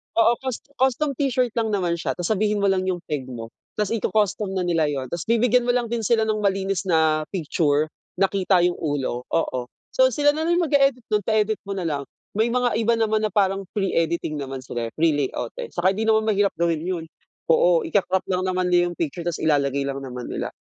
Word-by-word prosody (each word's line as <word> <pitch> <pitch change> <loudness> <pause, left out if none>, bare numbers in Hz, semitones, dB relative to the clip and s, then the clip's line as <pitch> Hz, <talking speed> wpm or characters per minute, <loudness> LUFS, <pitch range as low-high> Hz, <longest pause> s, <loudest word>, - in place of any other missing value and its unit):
Oo, 230 +1 +4
cus 260 -3 -4 0.2
custom 265 +3 +2
t-shirt 255 -3 0
lang 220 -2 0
naman 175 -3 -1
siya, - - -2
tapos 175 +4 -2
sabihin 210 0 +1
mo 195 - +4
lang 185 0 0
yung 180 -2 -2
peg 145 -5 -4
mo 115 -2 -7 0.2
'tas 210 -1 -1
iko-custom 210 -3 0
na 185 - 0
nila 165 -3 +1
yun, 140 -3 -2
'tas 170 +3 -4
bibigyan 240 +1 +3
mo 245 - +3
lang 235 -2 -1
din 235 - 0
sila 220 +1 +2
ng 215 -1 0
malinis 195 -2 0
na 155 -2 +2
picture, 155 -3 0 0.2
na 195 - +2
kita 190 -2 +2
yung 175 0 +1
ulo, 135 -5 -2
oo. 130 -6 -1 0.3
So 260 0 +5
sila 290 +4 +3
na 315 +2 -2
rin 345 - +3
mag-eedit 275 -5 +2
nun, 210 - +3
pa-edit 215 +1 0
mo 200 - -3
nalang 150 -7 -3 0.2
may 220 +3 +1
mga 245 0 +1
iba 230 +1 +2
naman 220 -1 +1
na - - -10
parang 195 -2 +1
free 195 -2 0
editing 165 -2 -1
naman 135 -1 -6
sila 120 -3 -4
eh, - - -9
free 165 +1 +3
layout 140 -5 -2
eh, - - -4
saka 185 +2 +3
hindi 215 +3 -2
naman 220 0 +4
mahirap 205 -2 +2
gawin 170 -2 +1
yun 175 -2 -2 0.5
oo, 170 0 +4
ikaka-crop 190 -2 +1
lang 185 0 0
naman 185 -1 0
yung 175 -1 +2
picture 165 +1 -3
'tas 170 - -2
ilalagay 140 -2 +2
lang 140 0 -3
naman 125 -2 -7
nila, - - -3
190 Hz, 215 wpm, -23 LUFS, 160-220 Hz, 0.5 s, So